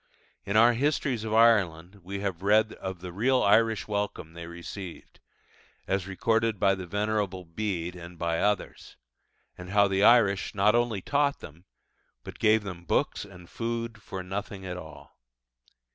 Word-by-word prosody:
In 100 +2 +1
our 120 +2 +6
Histories 135 -2 0
of 110 - -4
Ireland 100 -5 +3
we 100 +2 -5
have 95 -4 -3
read 105 +2 +3
of 95 -2 -7
the 90 -1 -7
real 125 +7 +2
Irish 110 +2 +3
welcome 100 -6 -3
they 85 0 -8
received 85 +1 -9 0.7
as 95 -1 -1
recorded 110 +2 0
by 95 +1 +4
the 95 -2 -6
Venerable 105 -1 -2
Bede 90 -1 -3
and 85 0 -10
by 85 0 -1
others 105 0 -2 0.6
and 90 0 -8
how 100 0 +4
the 95 0 +1
Irish, 105 -5 +4
not 105 +2 +4
only 120 -4 +1
taught 145 0 +1
them, 85 +4 -12 0.6
but - - -10
gave 110 0 +4
them 90 -3 -7
books 85 - 0
and 90 -3 -14
food 115 0 -4
for 95 -1 -6
nothing 95 +1 -6
at 90 -1 -4
all! 80 -4 -12
100 Hz, 160 wpm, -27 LUFS, 90-110 Hz, 0.7 s, our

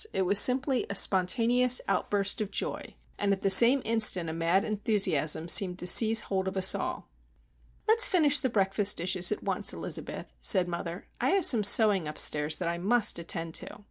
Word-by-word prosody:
It 190 - -2
was 195 +2 +3
simply 260 +1 +1
a 200 - -6
spontaneous 235 +7 +1
outburst 200 0 -3
of 210 - -5
joy; - - -7 0.2
and 200 -1 -2
at 195 - -4
the 195 - +1
same 240 +7 +6
instant 215 -7 -1
a - - -8
mad 170 +4 -2
enthusiasm 195 - -1
seemed 180 0 +4
to 180 - -6
seize 220 +5 +4
hold 190 -1 -5
of 190 0 -6
us 190 0 +3
all. - - -7 0.8
"Let's 455 +3 +4
finish 295 -6 +1
the 260 - -3
breakfast 200 -1 -1
dishes 180 +1 -1
at 210 - -6
once, - - -2
Elizabeth," - - -6
said 185 -4 +2
mother. 170 0 -8
"I - - -2
have 375 - -1
some 225 -5 +3
sewing 205 -4 +4
upstairs 150 0 +1
that 180 - -6
I 170 0 -5
must 210 +1 -2
attend 165 -1 -5
to." - - -13
195 Hz, 185 wpm, -26 LUFS, 180-230 Hz, 0.8 s, same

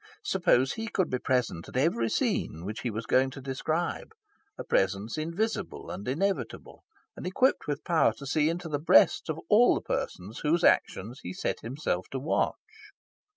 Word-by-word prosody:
Suppose 130 +2 +2
he 225 0 -5
could 185 -6 0
be 125 - 0
present 125 -11 -1
at - - -5
every 130 -5 +2
scene 80 -4 -1
which 105 +2 -5
he 125 - -2
was 110 +1 -4
going 130 +3 +3
to 130 - -9
describe, 155 - -3 0.4
a - - -5
presence 100 +3 0
invisible 185 +5 -3
and 100 +5 -7
inevitable, 190 +10 -2 0.3
and - - -6
equipped 255 +8 +2
with 145 -1 -3
power 170 -3 +3
to 140 - -10
see 150 +2 +2
into 170 +1 -3
the 145 -2 -2
breasts 160 - +4
of 160 0 -2
all 230 +6 +6
the - - -2
persons 100 +6 -4
whose 165 +3 +1
actions 115 +7 +2
he 90 - -6
set - - -2
himself 115 -7 -3
to 135 - -4
watch... 145 +5 0
140 Hz, 175 wpm, -28 LUFS, 115-170 Hz, 0.4 s, all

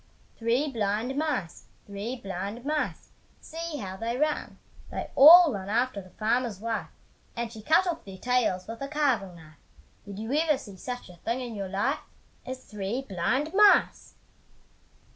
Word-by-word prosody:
Three 240 +6 +1
blind 220 +3 -1
mice, 280 - -2 0.2
three 205 +5 -5
blind 200 +2 -6
mice, 300 0 -2 0.3
See 330 -1 -6
how 190 -5 -6
they 230 +3 -2
run! 300 +2 -1 0.3
They - - -5
all 325 +1 +10
run 195 -1 -5
after 235 -1 0
the 185 - -15
farmer's 225 0 -1
wife, 215 -7 -3 0.5
And 235 -1 -4
she 220 - -9
cut 320 - +4
off 340 -2 -3
their 195 -1 -10
tails 240 -5 0
with 225 +2 -8
a 275 - -3
carving 270 - 0
knife, 155 -2 -16 0.5
Did 200 -1 -8
you 220 +5 -4
ever 305 -1 +3
see 200 -7 -11
such 245 +5 -6
a 175 - -14
thing 230 +8 -2
in 245 -2 -5
your 200 -3 -5
life 205 +9 0 0.5
As 260 0 -6
three 210 +5 -4
blind 260 - -1
mice! 415 0 +4
235 Hz, 160 wpm, -27 LUFS, 200-275 Hz, 0.5 s, all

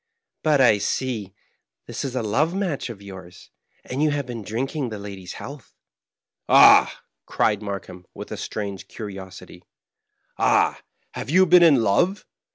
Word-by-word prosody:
" - - -61
But 150 -2 +3
I 110 -5 +5
see 105 -3 -3 0.5
this - - -6
is 130 -2 -4
a 125 - -1
love 150 - 0
match 185 -10 -2
of 100 -4 -10
yours, 95 -3 -12 0.3
and 130 +3 -4
you 155 - +3
have 145 -1 -2
been 120 -3 -6
drinking 130 - -3
the 110 - -6
lady's 100 -3 -8
health." 140 -2 -10 0.7
"Ahl" - - +8 0.4
cried 105 -1 0
Markheim, 95 -3 -7
with - - -9
a - - -3
strange 100 -3 -6
curiosity, 95 -4 -9
*^ - - -28 0.8
Ah, - - +2 0.3
have 115 - -7
you 185 +5 +5
been 180 0 +6
in 145 -8 +5
love 175 - +1
115 Hz, 160 wpm, -23 LUFS, 100-145 Hz, 0.8 s, Ahl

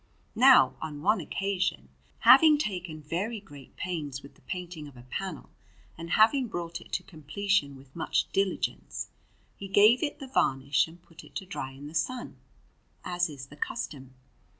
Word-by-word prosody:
Now, 260 +2 +7
on 150 -2 -6
one 210 +1 +3
occasion, 190 +2 -2 0.3
having 310 -2 +8
taken 180 - -4
very 195 +9 -2
great 145 -10 -14
pains 150 -7 -4
with 140 - -13
the - - -25
painting 175 -4 -6
of 135 -3 -14
a 120 - -12
panel, 155 +5 -6 0.4
and 165 +1 -8
having 240 - +4
brought 170 -4 -5
it - - -16
to - - -1
completion 160 -2 -1
with 135 0 -17
much 165 - 0
diligence, 195 -1 -1 0.5
he 200 - -7
gave 210 +5 +6
it 295 - -2
the 275 - -8
varnish 140 - +2
and 165 +2 -14
put 165 - -14
it - - -17
to 195 - -4
dry 180 -8 -5
in 140 +2 -11
the 150 - -9
sun, 165 +11 -2 0.7
as 175 -1 0
is 140 -3 -8
the 140 - -14
custom. 140 - -5
175 Hz, 170 wpm, -29 LUFS, 145-200 Hz, 0.7 s, having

